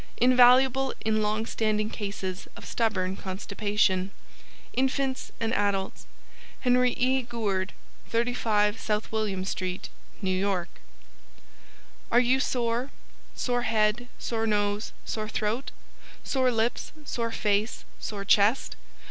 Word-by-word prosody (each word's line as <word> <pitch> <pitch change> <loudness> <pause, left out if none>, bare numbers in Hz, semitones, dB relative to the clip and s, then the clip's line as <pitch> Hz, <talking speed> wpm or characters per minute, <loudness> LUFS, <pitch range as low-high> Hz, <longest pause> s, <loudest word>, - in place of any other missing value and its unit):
Invaluable 255 +2 +5
in 215 0 +2
long 215 +1 0
standing 215 -1 0
cases 195 -3 -4
of - - -10
stubborn 190 -5 0
constipation: 195 0 0 0.6
INFANTS 265 0 0
AND 225 0 0
ADULTS 200 -1 -1 0.5
HENRY 250 -1 +4
E. 260 +1 +2
GOURD 210 -6 -2 0.4
35 225 -3 +1
South 210 0 -2
William 205 -4 -1
Street 185 -1 -3 0.3
NEW 185 -1 +1
YORK 190 -2 0 1.4
Are 240 - +6
You 250 +2 +3
Sore? 245 0 0 0.5
Sore 245 -1 0
Head, 220 +1 +1
Sore 225 -1 -2
Nose, 205 0 0
Sore 215 -1 -3
Throat? 220 +5 -1 0.5
Sore 260 -2 +2
Lips, 230 0 0
Sore 230 -4 -2
Face, 210 +1 0
Sore 200 -2 -5
Chest? 210 +5 +3
220 Hz, 110 wpm, -27 LUFS, 205-245 Hz, 1.4 s, Are